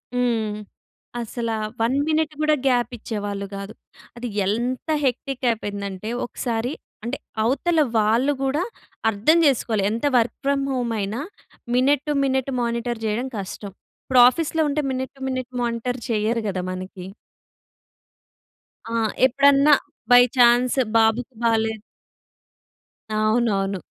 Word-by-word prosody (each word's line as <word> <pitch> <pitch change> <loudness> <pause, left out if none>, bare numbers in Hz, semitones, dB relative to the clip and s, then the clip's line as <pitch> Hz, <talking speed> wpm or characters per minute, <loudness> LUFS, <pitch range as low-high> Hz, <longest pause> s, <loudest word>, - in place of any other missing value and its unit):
హ్మ్. 230 -4 0 0.7
అసలా 230 0 -3 0.3
1 235 +4 +2
మినిట్ 310 -1 +1
కూడా 305 0 +3
గ్యాప్ 245 -2 +2
ఇచ్చేవాళ్ళు 205 -2 -4
కాదు. 200 +2 -7 0.4
అది 245 +1 -4 0.2
ఎంత 240 +7 -2 0.2
హెక్టిక్ 265 0 -2
అయిపోయిందంటే, 200 -2 -4 0.2
ఒకసారి 240 +1 -3 0.3
అంటే 240 +4 -3 0.3
అవతల 285 +8 +1 0.2
వాళ్ళు 230 +7 +3
కూడా 275 +5 0 0.5
అర్థం 225 +11 +3
చేసుకోవాలి. 230 -6 +2
ఎంత 230 +5 -2
వర్క్ 235 0 +1
ఫ్రమ్ 280 0 +1
హోమ్ 245 -3 -1
అయినా, 210 +7 -3 0.5
మినిట్ 270 +2 +3
టు - - +2
మినిట్ 265 0 0
మానిటర్ 235 0 -2
చేయడం 220 +4 -1
కష్టం. 200 +1 -6 0.3
ఇప్పుడు 255 -2 +5
ఆఫీస్‌లో 320 +3 -1
ఉంటే 300 +1 0
మినిట్ 260 0 -4
టు 270 - -16
మినిట్ 255 -1 -4
మానిటర్ 240 +1 -2
చేయరు 225 +1 0
కదా! 185 -2 -2
మనకి. 185 0 -7 1.9
ఆ! - - -3 0.3
ఎప్పుడన్నా, 280 +2 +5 0.4
బై 245 0 +9
ఛాన్స్ 245 +1 +5 0.2
బాబుకి 225 +3 +2
బాలేదు. 225 -2 +1 1.3
అవునవును. 215 -3 +1
235 Hz, 120 wpm, -23 LUFS, 220-260 Hz, 1.9 s, బై